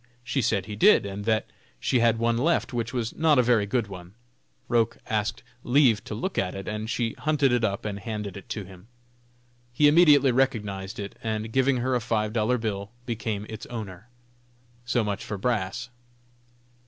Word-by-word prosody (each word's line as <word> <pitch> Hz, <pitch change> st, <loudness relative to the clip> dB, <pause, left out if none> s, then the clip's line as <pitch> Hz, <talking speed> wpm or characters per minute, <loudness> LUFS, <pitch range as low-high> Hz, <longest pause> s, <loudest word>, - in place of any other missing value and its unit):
She 135 Hz, +2 st, -1 dB
said 105 Hz, -5 st, 0 dB
he 105 Hz, 0 st, -6 dB
did, 105 Hz, -, +5 dB
and 100 Hz, +1 st, -5 dB
that 110 Hz, -1 st, +1 dB, 0.3 s
she 125 Hz, -, +1 dB
had 115 Hz, -1 st, +3 dB
one 115 Hz, 0 st, +1 dB
left, 150 Hz, +3 st, +1 dB
which 115 Hz, -1 st, -2 dB
was 120 Hz, -3 st, -3 dB
not 155 Hz, -2 st, +3 dB
a 125 Hz, -, +5 dB
very 115 Hz, -4 st, +3 dB
good 120 Hz, +1 st, 0 dB
one. 95 Hz, -1 st, -11 dB, 0.5 s
Roch 115 Hz, 0 st, +1 dB
asked 110 Hz, -2 st, -1 dB, 0.2 s
leave 120 Hz, -4 st, +4 dB
to 105 Hz, -, -5 dB
look 190 Hz, -, -2 dB
at 90 Hz, 0 st, -2 dB
it, 95 Hz, -, -7 dB
and 110 Hz, +1 st, -4 dB
she 115 Hz, -1 st, -1 dB
hunted 145 Hz, -3 st, +2 dB
it 120 Hz, -1 st, +1 dB
up 100 Hz, -1 st, -1 dB
and 100 Hz, -1 st, -3 dB
handed 105 Hz, -3 st, -5 dB
it 100 Hz, -, -11 dB
to 105 Hz, -, -4 dB
him. 95 Hz, +1 st, -14 dB, 0.8 s
He 145 Hz, +5 st, +4 dB
immediately 145 Hz, -4 st, +6 dB
recognized 105 Hz, -7 st, -1 dB
it, 100 Hz, -1 st, -7 dB
and 110 Hz, 0 st, -3 dB
giving 130 Hz, 0 st, +3 dB
her 130 Hz, +2 st, 0 dB
a 125 Hz, -, +1 dB
five 110 Hz, -2 st, -1 dB
dollar 120 Hz, +2 st, +1 dB
bill, 100 Hz, -3 st, -3 dB, 0.2 s
became 110 Hz, -3 st, -3 dB
its 110 Hz, -1 st, -8 dB
owner. 110 Hz, -2 st, -7 dB, 0.8 s
So 120 Hz, -1 st, +1 dB
much 100 Hz, -2 st, -3 dB
for 105 Hz, -, -5 dB
brass. 115 Hz, +2 st, -2 dB
115 Hz, 185 wpm, -26 LUFS, 105-125 Hz, 0.8 s, immediately